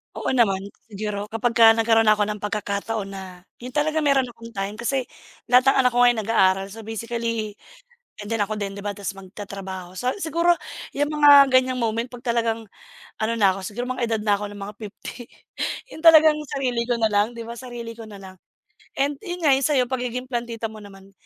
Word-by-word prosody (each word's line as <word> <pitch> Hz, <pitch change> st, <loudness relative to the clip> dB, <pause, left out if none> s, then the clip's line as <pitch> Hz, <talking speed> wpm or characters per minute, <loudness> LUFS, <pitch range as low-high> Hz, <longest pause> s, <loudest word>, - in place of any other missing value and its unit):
Oo -, -, -2 dB
naman, 205 Hz, -7 st, +2 dB, 0.2 s
siguro 205 Hz, -1 st, -4 dB
kapagka 225 Hz, 0 st, +4 dB
nagkaroon 225 Hz, 0 st, +3 dB
ako 210 Hz, -1 st, +5 dB
ng 210 Hz, 0 st, -3 dB
pagkakataon 205 Hz, 0 st, -3 dB
na 185 Hz, -2 st, -9 dB, 0.2 s
yun 250 Hz, +2 st, -9 dB
talaga 310 Hz, +1 st, +1 dB
meron 280 Hz, -3 st, +3 dB
akong 230 Hz, -2 st, -10 dB
time 200 Hz, +2 st, -4 dB
kasi 260 Hz, +2 st, 0 dB, 0.5 s
lahat 250 Hz, +1 st, +6 dB
ng -, -, +2 dB
anak 250 Hz, -, +4 dB
ko 245 Hz, -, -3 dB
ngayon 245 Hz, -2 st, +5 dB
nag-aaral. 195 Hz, -3 st, +2 dB
So, 220 Hz, 0 st, -10 dB
basically, 230 Hz, -1 st, -3 dB, 0.7 s
and 205 Hz, -, -8 dB
then 225 Hz, -, 0 dB
ako 210 Hz, +1 st, -1 dB
din, 200 Hz, -2 st, -3 dB
‘di 200 Hz, -, -9 dB
ba, 205 Hz, 0 st, -4 dB
tapos 195 Hz, -1 st, -6 dB
magtatrabaho. 190 Hz, -2 st, -8 dB
So, 250 Hz, +1 st, -1 dB
siguro 345 Hz, -2 st, +2 dB, 0.4 s
yung 290 Hz, +2 st, 0 dB
mga 285 Hz, -2 st, +7 dB
ganiyang 255 Hz, 0 st, +3 dB
moment 230 Hz, +2 st, -1 dB
‘pag 245 Hz, -1 st, -12 dB
talagang 230 Hz, -2 st, 0 dB, 0.6 s
ano 230 Hz, +1 st, +1 dB
na 195 Hz, -3 st, +4 dB
ako, 195 Hz, -, -7 dB
siguro 245 Hz, +6 st, -4 dB
mga 250 Hz, -, -3 dB
edad 220 Hz, -1 st, 0 dB
na 205 Hz, -, +5 dB
ako 205 Hz, 0 st, -5 dB
ng 205 Hz, -, -10 dB
mga 200 Hz, +2 st, -7 dB
50, 215 Hz, +3 st, -9 dB, 0.6 s
yun 320 Hz, -, -12 dB
talagang 315 Hz, -2 st, +8 dB, 0.2 s
sarili 250 Hz, -4 st, -1 dB
ko 235 Hz, -1 st, -1 dB
nalang, 215 Hz, 0 st, +2 dB
‘di 230 Hz, -1 st, -8 dB
ba, 235 Hz, -, -6 dB
sarili 235 Hz, -2 st, -8 dB
ko 230 Hz, -, -9 dB
na 210 Hz, -2 st, -11 dB
lang, 190 Hz, -1 st, -11 dB, 0.6 s
and, 280 Hz, +1 st, 0 dB
yun 355 Hz, -3 st, -6 dB
nga, 295 Hz, -, +5 dB
yung 265 Hz, 0 st, +3 dB
sa‘yo, 275 Hz, -4 st, +3 dB
pagiging 250 Hz, -1 st, -2 dB
plantita 235 Hz, -2 st, -3 dB
mo 215 Hz, -, -10 dB
naman. 195 Hz, -1 st, -14 dB
230 Hz, 200 wpm, -23 LUFS, 205-250 Hz, 0.7 s, talagang